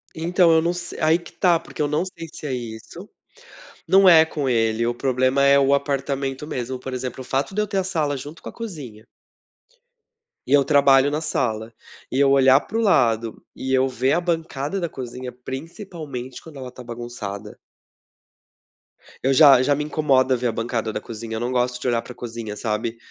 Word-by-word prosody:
Então, 170 +1 +3
eu 160 - +4
não 170 +2 0
se 175 0 -7
aí 160 +1 +4
que 170 -1 -13
tá, 175 -3 +3
porque 165 - -8
eu 150 - +2
não 150 +5 0
sei 170 -3 -8
se - - -10
é 140 - -2
isso. 115 -3 -8 0.8
Não 190 +3 +6
é 165 -3 +8
com 150 -3 -3
ele, 115 -2 +1
o 120 - 0
problema 130 +2 +1
é 140 0 +6
o 140 0 +3
apartamento 140 -1 -2
mesmo. 130 -3 -4
Por 130 +1 -7
exemplo, 125 0 -5
o - - -7
fato 135 +7 -2
de 210 - +1
eu - - 0
ter 195 - -3
a 190 - +1
sala 155 -6 -1
junto 145 +5 -9
com - - -6
a - - -10
cozinha 145 - -8 1.4
e - - -6
eu 145 -1 +6
trabalho 140 -2 +5
na 150 +2 -2
sala. 115 -7 -2 0.4
E 130 - 0
eu 140 -1 +5
olhar 135 0 +6
para 225 - -5
o - - +1
lado 115 - +2
e 130 0 -3
eu 130 0 +3
ver 130 +1 0
a 175 - +1
bancada 165 -1 -2
da 170 -2 -2
cozinha, 125 -1 -7
principalmente, 135 - -8
quando 160 -3 -13
ela 130 -1 -7
está 125 0 -11
bagunçada 115 -4 -7 1.7
eu 135 +1 +3
já 135 -3 +7
já 145 - +3
me 150 +1 -2
incomoda 135 -4 +2
ver 125 0 -1
a - - 0
bancada 115 0 -2
da - - -3
cozinha. 115 0 -7
Eu - - -3
não 120 +2 -2
gosto 125 0 0
de - - -2
olhar 120 -1 +1
para - - -11
a - - -29
cozinha, 115 -3 -7
sabe, 115 +2 -3
135 Hz, 205 wpm, -22 LUFS, 120-155 Hz, 1.7 s, é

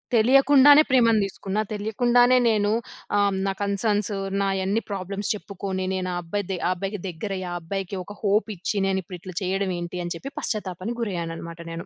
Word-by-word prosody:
తెలియకుండానే 275 +5 +7
ప్రేమను 230 -4 +4
తీసుకున్నా. 195 +1 -3
తెలియకుండానే 245 +4 +3
నేనూ 210 -1 +2 0.5
ఆహ్, 200 -1 +3
నా 195 - 0
కన్‌స‌న్స్ 205 +1 0 0.3
నాయన్ని 195 +3 0
ప్రాబ్లమ్స్ 195 +1 -3
చెప్పుకోని 195 -2 -4
నేను 185 -1 -2
ఆ - - -2
అబ్బాయిది 190 +1 -3
ఆ - - +2
అబ్బాయికి 195 +2 -4
దెగ్గిరయి 185 +2 -4
ఆ - - -3
అబ్బాయికి 195 +2 -4
ఒక 205 - -10
హోప్ 205 +1 +2
ఇచ్చి 200 +4 -2
నేను 190 0 +1
ఇప్పుడు 180 +1 -8
ఇట్ల 185 -2 -8
చేయడం 190 +1 0
ఏంటి 175 +1 -5
అని 175 - -3
చెప్పి 275 +10 -8
పశ్చాత్తాపానికి 210 +2 -3
గురయ్యాను 170 -6 -3
అనమాట 170 0 -8
నేను. 165 0 -6
200 Hz, 165 wpm, -24 LUFS, 185-215 Hz, 0.5 s, తెలియకుండానే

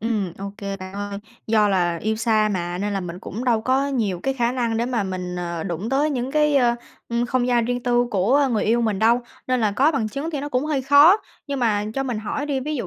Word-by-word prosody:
ừm, 210 -5 -1
ô 195 0 -6
kê 200 -2 -4
bạn 185 -1 -9
ơi, 200 0 -4 0.3
do 215 -1 +3
là 175 -3 +1
yêu 220 +1 0
xa 215 -1 +2
mà 175 -1 -3
nên 205 +2 -2
là 195 - -1
mình 175 -1 -6
cũng 225 +6 -6
đâu 235 -3 +2
có 260 +4 +1
nhiều 220 -10 -1
cái 270 - 0
khả 240 -2 0
năng 235 -3 -1
để 235 +1 0
mà 245 -4 0
mình, 180 -2 -4
ờ, 170 -2 -4
đụng 180 +3 -4
tới 285 +3 +2
những 255 -2 -2
cái, 300 -1 +3
ờ, 240 -3 +3 0.3
ừm, 235 +1 0
không 245 0 0
gian 240 -2 +2
riêng 245 +1 -2
tư 245 0 +2
của 250 +9 +3
người 215 - +1
yêu 235 +2 +2
mình 215 -4 0
đâu, 230 +3 +4 0.3
nên 255 -1 +1
là 215 -2 +1
có 280 +9 +3
bằng 230 -7 -1
chứng 280 +9 -4
thì 295 -4 -3
nó 290 - -4
cũng 255 0 0
hơi 300 -3 -1
khó. 285 +7 +7 0.3
Nhưng 280 -2 -3
mà 210 -4 +1
cho 270 - 0
mình 250 -5 -3
hỏi 285 +7 -3
đi, 280 -3 -1
ví 305 +4 -3
dụ 245 - -3
235 Hz, 265 wpm, -22 LUFS, 200-265 Hz, 0.3 s, khó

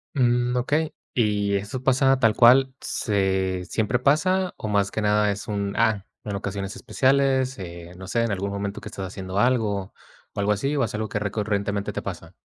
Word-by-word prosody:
Mm, 125 -1 +2
okey, 150 +5 0 0.2
¿y 105 -3 +1
eso 105 +6 -4
pasa 135 0 +3
tal 115 -4 +3
cual 130 +2 +6
se 95 -3 0
siempre 110 +4 0
pasa 180 +7 +2
o 110 - -6
más 100 -1 +1
que 110 - -3
nada 105 0 +3
es 100 +2 -5
un, 100 -1 -2
ah, 100 -3 +1 0.2
en 105 -2 -4
ocasiones 100 0 -4
especiales, 135 -1 +1
eh, 85 -2 -8
no 95 0 -9
sé, 115 +4 0
en 115 -3 0
algún 100 +1 -2
momento 100 +1 -4
que - - -8
estás 95 -1 -6
haciendo 95 +1 -5
algo 105 -5 +1 0.4
o - - -9
algo 105 +1 +2
así 135 +9 -1
o 135 - +2
es 110 - -5
algo 110 0 -2
que 105 - -1
recurrentemente 100 -1 -2
te - - -3
pasa? - - -7
105 Hz, 195 wpm, -24 LUFS, 100-125 Hz, 0.4 s, cual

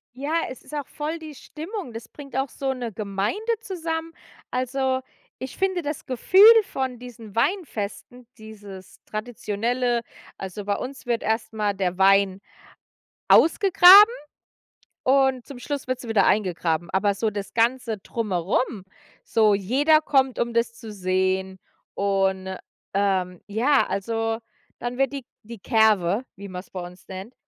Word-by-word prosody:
Ja, 285 +4 -4 0.2
es 255 - -10
ist - - -15
auch 290 -3 -4
voll 310 +2 -4
die 310 -2 -10
Stimmung. 320 - -7
Das 230 0 -9
bringt 275 -3 -11
auch 270 0 0
so 270 -1 -3
'ne 245 -3 -5
Gemeinde 200 - -2 0.2
zusammen. 330 -4 -4 0.4
Also, 260 +1 -1 0.4
ich 260 - -7
finde 380 -2 0
das 295 -1 -5
Gefühl 265 - +3 0.2
von 260 -9 -4
diesen 230 -4 -11
Weinfesten, 245 - -3
dieses 205 -4 -12
Traditionelle 235 +2 -2 0.4
also, 195 +1 -7
bei 200 -1 0
uns 260 0 -7
wird 235 -1 -1
erst 220 0 -1
mal 210 -2 0
der 185 -2 -2
Wein 195 0 +4 0.9
ausgegraben 390 +5 +8 0.9
und 265 -2 +2
zum 275 -3 -10
Schluss 280 0 -5
wird 255 -1 -2
sie 240 - -9
wieder 225 - +3
eingegraben. 175 -4 0
Aber 200 +1 +2
so 220 +2 0
das 200 -1 -6
ganze 230 -1 +1
Drumherum, 200 +1 -2 0.4
so 215 -2 +3
jeder 285 +11 +3
kommt, 265 -4 +1
um 235 -1 -1
das 235 0 +1
zu 225 -2 -10
sehen. 190 0 -1 0.4
Und, 190 -1 0 0.4
ähm, 190 -3 0
ja, 250 +7 +2
also 225 +2 -2 0.4
dann 245 +1 -4
wird 270 +1 +1
die 275 -3 -6 0.2
die 230 -1 -10
Kerwe, 220 -1 +2
wie 200 +1 -9
man's 180 +1 -8
bei 185 - -5
uns 180 +1 -11
nennt, 190 +6 -8
230 Hz, 145 wpm, -24 LUFS, 200-265 Hz, 0.9 s, ausgegraben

